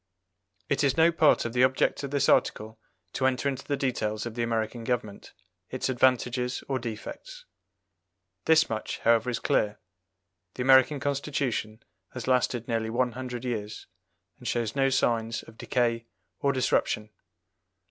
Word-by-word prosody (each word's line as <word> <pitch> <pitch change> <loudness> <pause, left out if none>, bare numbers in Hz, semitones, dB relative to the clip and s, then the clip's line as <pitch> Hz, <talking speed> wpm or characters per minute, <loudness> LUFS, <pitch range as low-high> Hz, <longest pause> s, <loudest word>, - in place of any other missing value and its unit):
It 140 - 0
is 140 0 +2
no 165 +1 +5
part 160 -6 +3
of 115 - -3
the 125 0 +3
object 130 0 +2
of 140 - -4
this 140 0 +1
article 110 +1 +1 0.3
to 130 - +1
enter 130 +1 0
into 135 -2 -2
the 145 - -1
details 110 -5 -2
of 120 - -5
the 120 - -3
American 115 0 -2
government, 115 -4 -3 0.4
its 130 +1 -2
advantages 125 0 +1
or 135 -1 -1
defects. 130 - -8 1.0
This 160 0 +5
much, 110 -1 -4
however, 115 +1 +3
is 120 - -1
clear 105 0 0 0.8
the 125 - -2
American 130 +2 +5
Constitution 135 -6 -2 0.3
has 125 -3 -6
lasted 125 -2 +1
nearly 115 -2 -1
one 125 +2 0
hundred 125 0 -6
years, 110 -4 -4 0.5
and - - -8
shows 115 -1 -1
no 135 -1 +3
signs 115 -3 0
of 115 - -15
decay 115 -2 0 0.3
or 140 - +2
disruption. 110 -4 0
125 Hz, 150 wpm, -27 LUFS, 115-135 Hz, 1.0 s, no